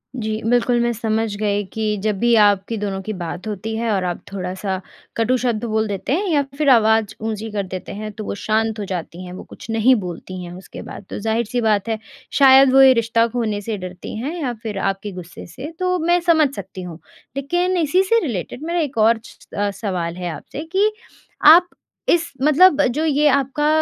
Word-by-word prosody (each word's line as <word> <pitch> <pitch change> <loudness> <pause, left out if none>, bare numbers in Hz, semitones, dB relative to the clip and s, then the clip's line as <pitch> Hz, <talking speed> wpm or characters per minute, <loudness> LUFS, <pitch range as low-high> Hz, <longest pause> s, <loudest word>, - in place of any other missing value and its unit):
जी, 220 -2 -3
बिल्कुल 245 0 +3
मैं 240 - +1
समझ 220 -1 -1
गई 205 -1 0
कि 215 -1 -1
जब 215 -2 0
भी 235 +2 +3
आपकी 205 +2 +2
दोनों 200 -2 -3
की 215 +3 -5
बात 175 +1 -6
होती 215 +2 -4
है 230 0 -1
और 195 -3 0
आप 175 -1 -3
थोड़ा-सा 190 0 -3 0.4
कटू 230 +3 +2
शब्द 240 -3 -1
बोल 220 -1 0
देते 200 +6 -2
हैं 390 +6 0
या 300 -4 +3 0.2
फ़िर 300 -1 +2
आवाज़ 220 -3 +4
ऊँची 220 0 -3
कर 205 -1 -2
देते 185 0 -6
हैं। 215 +1 -6
तो 215 +1 -7
वो - - -3
शांत 220 +1 0
हो 205 - -3
जाती 180 -1 -5
हैं, 180 - -8
वो 185 - -8
कुछ - - -13
नहीं 225 +4 +4
बोलती 185 -2 -6
हैं। 175 - -8
उसके 185 +2 -10
बाद 200 - -9
तो - - -5
ज़ाहिर-सी 225 +3 -1
बात 215 -2 +1
है 220 -1 -1 0.4
शायद 265 -1 +7
वो 270 - +7
ये 265 -1 +8
रिश्ता 230 0 +2
खोने 220 -3 -2
से 215 +1 -4
डरती 185 -1 -7
हैं। 275 +9 -4
या 255 -4 -1
फ़िर 215 -3 -4
आपके 195 +1 -4
गुस्से 180 -2 -9
से। 255 - -8
तो 365 0 +1
मैं 345 +2 +3
समझ 320 -4 +4
सकती 190 -1 -8
हूँ। 175 -2 -8 0.4
लेकिन 350 +6 0
इसी 345 +3 +3
से 460 +4 +3
रिलेटेड 230 - -5
मेरा 340 +2 -1
एक 285 -6 -2
और 225 +1 +4
स - - -14 0.2
स 205 0 0 0.2
सवाल 170 -2 -2
है 180 -1 -4
आपसे 160 - -7
कि 405 +3 +3 0.6
आप 345 +3 +9 0.4
इस 340 0 +2
मतलब 305 +2 +5
जो 300 +6 -1
ये 300 0 +3
आपका 280 +2 +1
220 Hz, 210 wpm, -20 LUFS, 200-270 Hz, 0.6 s, आप